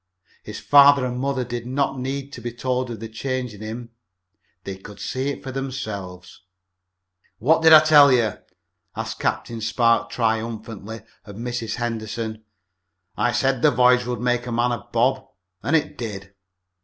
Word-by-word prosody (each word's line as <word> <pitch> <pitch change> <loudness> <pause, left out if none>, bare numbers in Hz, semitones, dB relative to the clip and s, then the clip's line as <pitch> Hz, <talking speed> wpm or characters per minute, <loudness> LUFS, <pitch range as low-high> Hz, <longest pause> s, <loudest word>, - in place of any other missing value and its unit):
His - - -8
father 140 -2 +6
and 125 0 -3
mother 135 -1 -1
did 120 0 -5
not 135 +1 -1
need 135 +2 -4
to 120 - -8
be 120 +1 -4
told 125 +1 -2
of 115 -3 -6
the 115 - -6
change 125 +1 -4
in 105 - -12
him. 115 +2 -7 0.7
They 95 - -5
could 100 +1 -12
see 130 +2 -2
it 140 - -6
for 135 - -6
themselves. 110 -9 -6 1.0
"What 155 +9 +3
did 160 0 +6
I 155 -1 +10
tell 150 -3 +7
you?" 115 -5 +1 0.6
asked - - -5
Captain 115 -1 -2
Spark 115 +1 +2
triumphantly 110 -2 -3 0.2
of 100 - -10
Mrs. 120 0 -4
Henderson. 110 -2 -4 0.7
"I 120 - +1
said 135 0 0
the - - +6
voyage 125 0 +3
would 125 -1 -3
make 125 0 0
a - - -4
man 120 +1 +1
of 120 -4 -6
Bob, 130 +3 +1 0.4
and 150 - +1
it 155 - -1
did." 100 -5 -6
120 Hz, 165 wpm, -22 LUFS, 110-130 Hz, 1.0 s, I